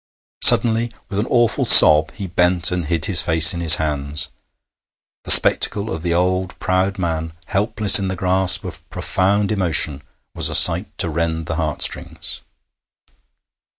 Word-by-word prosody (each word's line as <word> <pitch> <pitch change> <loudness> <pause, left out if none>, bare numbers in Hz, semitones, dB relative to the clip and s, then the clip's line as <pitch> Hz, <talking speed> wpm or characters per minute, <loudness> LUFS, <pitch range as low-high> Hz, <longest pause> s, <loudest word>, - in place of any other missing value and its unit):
Suddenly, 115 0 +3 0.2
with 100 - -6
an 110 - -4
awful 120 -2 -2
sob, 75 0 +6
he 100 - -9
bent 90 0 -1
and 90 -2 -5
hid 80 0 -3
his 95 - +2
face 80 -1 +4
in 85 - -8
his 80 -3 +7
hands. 75 -1 -3 1.0
The - - -11
spectacle 105 +1 +4
of 80 - -7
the 85 0 -5
old, 90 -1 -4
proud 95 +1 -4
man 80 -3 -6
helpless 105 +1 +2
in 95 - -5
the 95 - -6
grasp 95 +1 +1
of 85 -2 -11
profound 100 +6 -3
emotion 80 -7 -1 0.3
was - - +1
a - - -3
sight - - +4
to - - -1
rend 80 0 -5
the 80 0 -7
heart 75 -3 -3
strings. - - -6
90 Hz, 155 wpm, -16 LUFS, 80-95 Hz, 1.0 s, his